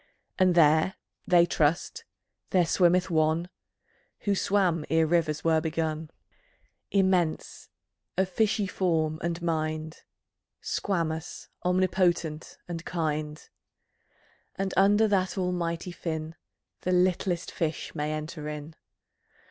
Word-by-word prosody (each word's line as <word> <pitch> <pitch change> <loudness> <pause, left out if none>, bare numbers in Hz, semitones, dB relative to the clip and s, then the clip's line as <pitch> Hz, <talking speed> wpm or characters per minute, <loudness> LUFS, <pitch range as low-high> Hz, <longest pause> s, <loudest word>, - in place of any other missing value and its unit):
And 185 -2 +4
there 160 +2 +4 0.3
(they 175 -1 +6
trust) 170 - 0 0.4
there 180 -2 +3
swimmeth 180 +2 +3
One 160 +2 +1 0.7
Who 205 - +1
swam 185 -5 +1
ere 160 0 +3
rivers 160 -2 +1
were 160 -1 +3
begun, 160 -1 -2 0.8
Immense, 185 -5 0 0.5
of 190 0 +2
fishy 210 +2 +1
form 160 -4 0
and 170 0 -2
mind, 155 -1 -2 0.6
Squamous, 165 -4 -3
omnipotent, 180 -3 0
and 170 -1 -5
kind; 155 -3 -3 1.1
And 195 -1 -2
under 205 +3 +5
that 190 -2 0
Almighty 180 -1 -2
Fin, 160 -2 -4 0.5
The 180 - -1
littlest 180 -1 +1
fish 160 -2 -3
may 150 -1 -2
enter 155 0 -5
in. 150 +1 -7
170 Hz, 105 wpm, -27 LUFS, 155-185 Hz, 1.1 s, they